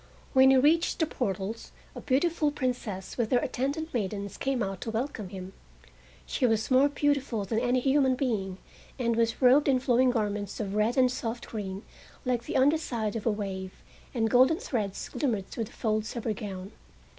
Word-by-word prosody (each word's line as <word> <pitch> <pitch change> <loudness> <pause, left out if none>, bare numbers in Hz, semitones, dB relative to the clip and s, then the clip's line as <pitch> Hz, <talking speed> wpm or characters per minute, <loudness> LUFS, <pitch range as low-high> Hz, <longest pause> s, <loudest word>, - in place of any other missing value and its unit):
When 265 -1 +7
he 265 - +6
reached 315 +6 +3
the 320 - +2
portals 205 - -3 0.2
a - - -8
beautiful 300 +3 +1
Princess 250 -9 -4
with 225 -2 +1
her 250 - +5
attendant 280 +6 -2
maidens 200 -3 -3
came 265 -4 -1
out 195 -1 -4
to - - -4
welcome 225 -3 -3
him. 190 0 -8 0.7
She 255 - +1
was 220 +1 0
more 265 +3 +5
beautiful 280 -6 0
than 220 +3 0
any 245 +1 +2
human 270 -1 +3
being, 210 -8 -2 0.4
and 235 -3 0
was 230 +2 0
robed 265 +4 +6
in 265 -2 +4
flowing 250 0 +3
garments 210 -4 -2
of 200 -3 -3
red 215 +4 +1
and 255 -1 +5
soft 235 -1 -4
green 200 -2 -5 0.4
like 245 -2 0
the - - -1
under 290 +4 +4
side 225 -8 -3
of 225 0 -3
a - - +4
wave, 190 -3 -5 0.3
and 225 -3 +1
golden 260 +7 +5
threads 225 - -3
glimmered 220 -9 -2
through 225 - -3
the - - -14
folds 215 0 -2
of 235 - -4
her 220 - 0
gown. 195 -1 -7
235 Hz, 185 wpm, -28 LUFS, 210-265 Hz, 0.7 s, When